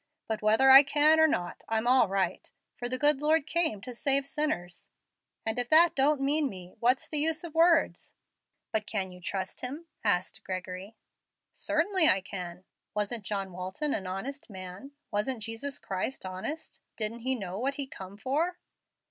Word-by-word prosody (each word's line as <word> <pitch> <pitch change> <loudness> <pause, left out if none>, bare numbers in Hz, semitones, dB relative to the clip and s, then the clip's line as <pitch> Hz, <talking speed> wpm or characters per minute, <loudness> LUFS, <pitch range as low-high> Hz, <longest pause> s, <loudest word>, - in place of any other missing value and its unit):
But 220 -1 -3
whether 220 +5 +5
I 270 +1 +12
can 300 +3 +4
or 315 - +6
not, 175 - -3
I'm 225 0 0
all 250 -2 +4
right, 190 -2 -2 0.3
for 245 0 -5
the 255 - -1
good 290 +1 +3
Lord 310 0 +2
came 315 - 0
to 250 +2 -8
save 275 +3 +1
sinners; 275 - -3 0.6
and 220 +2 0
if 245 0 -1
that 335 +1 +7
don't 280 +1 +2
mean 285 +1 +2
me, 185 -4 -11
what's 250 +3 +2
the 305 - 0
use 320 +3 0
of 335 -3 -8
words?" 330 0 +2 0.6
"But 215 -1 -2
can 195 -4 -2
you 180 0 -13
trust 190 +1 -4
Him?" 285 +7 -5 0.2
asked 185 -4 0
Gregory. 185 +3 -6 0.6
"Certain 410 - -1 0.2
I 190 - +5
can. 180 -2 -8 0.3
Wasn't 210 +1 -1
John 195 -2 -3
Walton 190 - -3
an 190 -3 -3
honest 255 +10 -6
man? 190 +7 -9 0.2
Wasn't 220 +2 -1
Jesus 230 +5 -4
Christ 190 +5 -4
honest? 190 +13 -6
Didn't 220 +1 -2
he 260 +3 +1
know 195 -4 -5
what 275 +3 -1
He 280 - -1
come 195 -6 -10
for?" 310 +10 -1
235 Hz, 175 wpm, -29 LUFS, 195-285 Hz, 0.6 s, I